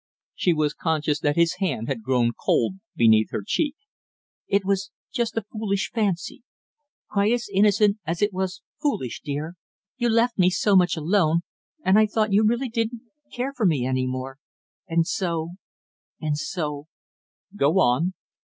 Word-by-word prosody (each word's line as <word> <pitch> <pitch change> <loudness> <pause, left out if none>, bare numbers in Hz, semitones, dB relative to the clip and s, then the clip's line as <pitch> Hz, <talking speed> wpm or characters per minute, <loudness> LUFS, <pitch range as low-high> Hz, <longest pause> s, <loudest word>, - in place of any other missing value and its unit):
She 180 - +1
was 155 -2 +1
conscious 155 -2 0
that 145 -1 +1
his 170 -1 +2
hand 140 - -1
had 135 -5 -2
grown 120 0 +2
cold 120 +12 0 0.2
beneath 110 -2 +4
her 105 - -4
cheek. 300 - 0 0.7
"It 200 -1 +1
was 195 0 0 0.2
just 235 -3 -1
a 225 - 0
foolish 210 -1 -2
fancy, 205 0 -1 0.7
quite 205 +1 +2
as 240 -1 -1
innocent 205 +1 +4
as 165 +1 -3
it 205 -1 +1
was 185 0 -3 0.2
foolish, 205 - -2
dear; 150 +3 -4 0.4
you 240 -2 +1
left 230 0 +2
me 180 0 +6
so 195 +2 +2
much 180 -3 +4
alone, 165 0 +2 0.4
and 195 +3 +5
I 215 - +5
thought 215 -1 0
you 210 +2 +5
really 240 +4 +1
didn't 230 0 -2 0.3
care 255 +3 -3
for 235 -7 +1
me 145 -7 +1
any 130 0 0
more, 130 +1 -5 0.5
and 165 -1 +2
so 170 -2 -2 0.7
and 155 -2 -1
so 150 -2 -4 0.3
" 205 - -29
"Go 150 +7 +3
on!" 165 +6 +2
185 Hz, 160 wpm, -24 LUFS, 150-210 Hz, 0.7 s, me